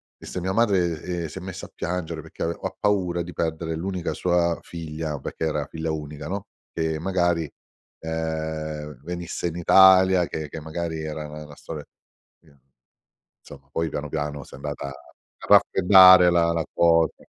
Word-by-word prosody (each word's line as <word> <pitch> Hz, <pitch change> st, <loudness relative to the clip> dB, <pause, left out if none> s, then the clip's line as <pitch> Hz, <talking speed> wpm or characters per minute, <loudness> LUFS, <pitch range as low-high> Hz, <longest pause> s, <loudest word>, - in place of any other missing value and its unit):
disse 90 Hz, -, -7 dB
"Mia 95 Hz, +2 st, -2 dB
madre," 95 Hz, -8 st, +2 dB, 0.2 s
ehm, -, -, -3 dB
"si 85 Hz, +5 st, -8 dB
è -, -, -11 dB
messa 95 Hz, 0 st, -7 dB
a -, -, -15 dB
piangere 85 Hz, -2 st, -4 dB
perché 80 Hz, -, -7 dB
ave 85 Hz, +1 st, -2 dB
ha -, -, -4 dB
paura 90 Hz, -4 st, +1 dB
di 90 Hz, -, -9 dB
perdere 80 Hz, 0 st, -2 dB
l'unica 90 Hz, +1 st, -3 dB
sua 85 Hz, -2 st, +1 dB
figlia", 80 Hz, -3 st, -5 dB
perché 80 Hz, -, -4 dB
era 75 Hz, -2 st, -1 dB
figlia 80 Hz, +1 st, -5 dB
unica, 75 Hz, -1 st, -6 dB
no, 100 Hz, +1 st, -4 dB, 0.3 s
che 80 Hz, -1 st, -2 dB
magari, 85 Hz, -3 st, 0 dB, 0.5 s
ehm, 80 Hz, -2 st, -4 dB
venisse 85 Hz, 0 st, -4 dB
in 85 Hz, -, -5 dB
Italia, 95 Hz, 0 st, +6 dB
che 80 Hz, -1 st, -5 dB
che 80 Hz, -, -7 dB
magari 80 Hz, +1 st, -4 dB
era 75 Hz, 0 st, -5 dB
na 75 Hz, 0 st, -9 dB
una 75 Hz, -, -13 dB
storia 75 Hz, 0 st, -8 dB, 0.6 s
sì. 80 Hz, -4 st, -24 dB, 0.9 s
Insomma, 70 Hz, -1 st, -14 dB
poi 80 Hz, +2 st, -1 dB
piano, 75 Hz, 0 st, -5 dB
piano 75 Hz, -2 st, -3 dB
si -, -, -17 dB
è -, -, -9 dB
andata 70 Hz, 0 st, -5 dB
a 70 Hz, -, -8 dB, 0.5 s
raffreddare 95 Hz, -1 st, +7 dB
la 85 Hz, -1 st, +3 dB
la 80 Hz, -2 st, -1 dB
cosa. 85 Hz, -1 st, +3 dB
80 Hz, 170 wpm, -24 LUFS, 80-90 Hz, 0.9 s, raffreddare